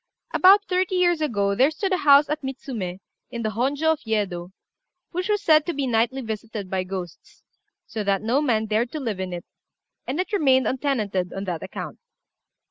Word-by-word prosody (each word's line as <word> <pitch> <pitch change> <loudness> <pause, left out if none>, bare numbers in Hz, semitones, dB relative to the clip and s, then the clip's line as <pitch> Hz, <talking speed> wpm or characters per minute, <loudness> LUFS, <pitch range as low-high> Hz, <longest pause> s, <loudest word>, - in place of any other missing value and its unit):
About 395 +3 +6
thirty 370 -1 0
years 350 -3 +2
ago 200 -9 +1
there 260 +8 +4
stood 380 +5 -2
a - - +3
house 285 -2 +6
at 300 +1 -2
Mitsumé, 245 - -5 0.3
in 235 -2 -5
the 215 - 0
Honjô 275 +8 +1
of 310 - -7
Yedo, 200 -6 -2 0.6
which 365 +3 -3
was 415 -1 +1
said 310 -1 +5
to 345 - -1
be 280 -1 -1
nightly 240 +2 +1
visited 220 -3 -6
by 190 -1 0
ghosts, 185 -2 -8 0.4
so 215 - -4
that 195 0 0
no 245 +6 +2
man 225 -7 +1
dared 220 +3 0
to 310 - -3
live 225 -8 -3
in 185 -1 -3
it, 175 -1 -6 0.6
and 275 +6 -2
it 375 +4 -2
remained 265 -9 +4
untenanted 215 -9 -1
on 195 - -4
that 175 -4 -4
account. - - -7
245 Hz, 190 wpm, -24 LUFS, 200-305 Hz, 0.6 s, About